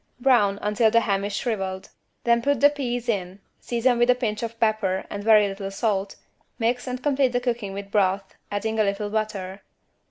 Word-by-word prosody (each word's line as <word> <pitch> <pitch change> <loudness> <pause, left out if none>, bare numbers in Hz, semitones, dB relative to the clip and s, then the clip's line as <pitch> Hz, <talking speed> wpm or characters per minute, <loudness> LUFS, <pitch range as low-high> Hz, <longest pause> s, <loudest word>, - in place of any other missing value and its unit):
Brown 235 -6 +3
until 210 +2 +3
the 230 +1 +4
ham 200 -3 0
is 205 0 -3
shrivelled; 195 -6 -3 0.3
then 235 0 +3
put 285 0 +1
the 290 +2 +6
peas 245 -4 -3
in, 195 -4 -2 0.2
season 240 0 +1
with 240 +1 +3
a 250 - +6
pinch 215 -4 -2
of 230 0 -5
pepper 215 -4 +1
and 205 0 -5
very 215 -1 +6
little 195 0 -5
salt, 195 -1 -1 0.4
mix 245 +2 -1
and 250 0 -4
complete 270 -3 +2
the 245 - +2
cooking 240 -5 -2
with 200 0 -7
broth, 195 -1 +1 0.2
adding 220 +2 -2
a - - +5
little 205 +1 -2
butter. 205 -3 -3
215 Hz, 190 wpm, -24 LUFS, 200-240 Hz, 0.4 s, the